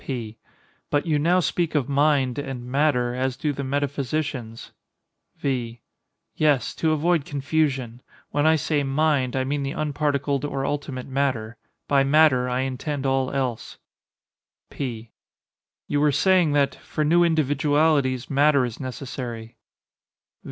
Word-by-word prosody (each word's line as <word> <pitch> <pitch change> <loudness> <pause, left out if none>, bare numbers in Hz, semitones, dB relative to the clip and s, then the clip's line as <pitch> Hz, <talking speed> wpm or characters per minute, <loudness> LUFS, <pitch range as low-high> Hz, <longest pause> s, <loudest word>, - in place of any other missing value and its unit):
P. 115 -5 -5 0.5
But 145 - +1
you 155 -3 +1
now 175 +5 +3
speak 170 -1 -1
of 140 -5 +1
"mind" 140 -2 +2
and 135 -4 -5
"matter" 125 -2 +1
as 130 0 -2
do 150 -4 -1
the 140 - -5
metaphysicians. 140 -3 -3 0.7
V. 120 -4 -3 0.5
Yes—to 155 +1 +1
avoid 160 +1 +2
confusion. 135 -4 -1 0.3
When 145 +1 +2
I 160 - +5
say 150 -1 0
"mind," 140 -2 +1
I 130 - +1
mean 140 +2 -2
the 135 +1 -3
unparticled 145 -2 -1
or 135 -2 -2
ultimate 140 -3 -3
matter; 130 -5 -1 0.3
by 140 -1 +3
"matter," 135 -3 +4
I 125 +1 0
intend 135 +2 -3
all 135 -1 +1
else. 130 -4 -3 0.9
P. 115 -4 -5 0.8
You 145 0 0
were 150 0 +4
saying 180 0 +3
that 140 -1 +2
"for 155 - -4
new 170 +3 +4
individualities 145 -4 +2
matter 140 -1 +3
is 120 -3 -7
necessary." 125 -3 -6
140 Hz, 130 wpm, -24 LUFS, 130-150 Hz, 0.9 s, I